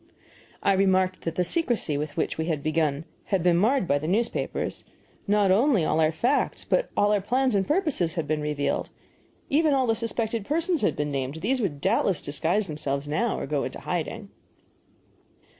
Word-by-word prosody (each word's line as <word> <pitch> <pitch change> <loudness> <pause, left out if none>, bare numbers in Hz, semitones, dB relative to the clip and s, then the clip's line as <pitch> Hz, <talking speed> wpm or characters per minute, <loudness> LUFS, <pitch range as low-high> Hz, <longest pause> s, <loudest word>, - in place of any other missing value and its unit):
I 200 - +4
remarked 190 -1 +2
that 165 -1 -4
the 180 - +2
secrecy 235 - 0
with 145 +1 -4
which - - -1
we 160 - -2
had 155 -4 -2
begun 155 -1 0 0.2
had 190 -4 0
been 175 -1 +4
marred 215 +3 +2
by 145 -2 +2
the 155 - -4
newspapers; 220 +7 -1 0.4
not 205 -1 +3
only 220 - +3
all 155 - +1
our 155 0 +3
facts 245 - 0
but - - 0
all 205 0 +4
our 205 -1 +2
plans 255 +5 +1
and 195 -1 +1
purposes 295 - 0
had 165 -4 -2
been 155 0 -1
revealed; 150 -1 -1 0.6
even 300 0 +3
all 260 -1 +2
the 225 - +2
suspected 225 0 -2
persons 330 - 0
had - - +1
been 150 0 -2
named; 135 0 -3
these 255 +5 0
would 150 -9 -2
doubtless 185 +2 +2
disguise 165 +8 0
themselves 145 -3 -3
now, 220 +11 0
or - - -3
go 140 0 -1
into 130 - -5
hiding. 195 +5 -4
185 Hz, 185 wpm, -26 LUFS, 155-230 Hz, 0.6 s, I